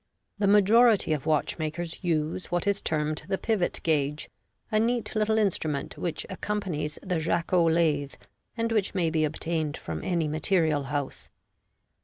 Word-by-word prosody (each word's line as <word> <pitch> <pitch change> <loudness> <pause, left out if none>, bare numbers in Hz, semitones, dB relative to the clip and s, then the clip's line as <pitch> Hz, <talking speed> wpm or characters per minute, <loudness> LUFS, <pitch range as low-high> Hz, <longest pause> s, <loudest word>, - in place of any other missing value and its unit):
The 200 - +2
majority 210 -2 +5
of 150 0 -3
watchmakers 160 +3 -1
use 165 +1 -1
what 175 0 -1
is 200 0 +1
termed 155 0 -1
the 190 - 0
pivot 210 -5 0
gauge, 150 -2 0 0.4
a 215 - +3
neat 235 +1 0
little 215 0 +2
instrument 160 -9 -1
which 170 - -3
accompanies 185 -6 -3
the 180 -4 -1
Jacot 165 +1 +2
lathe, 150 -4 +1 0.4
and 230 0 0
which 210 -3 0
may 170 -4 +1
be 155 -1 +1
obtained 155 0 -2
from 80 -1 -6
any 170 -3 0
material 155 -2 +1
house. 145 -1 -4
165 Hz, 145 wpm, -27 LUFS, 155-200 Hz, 0.4 s, majority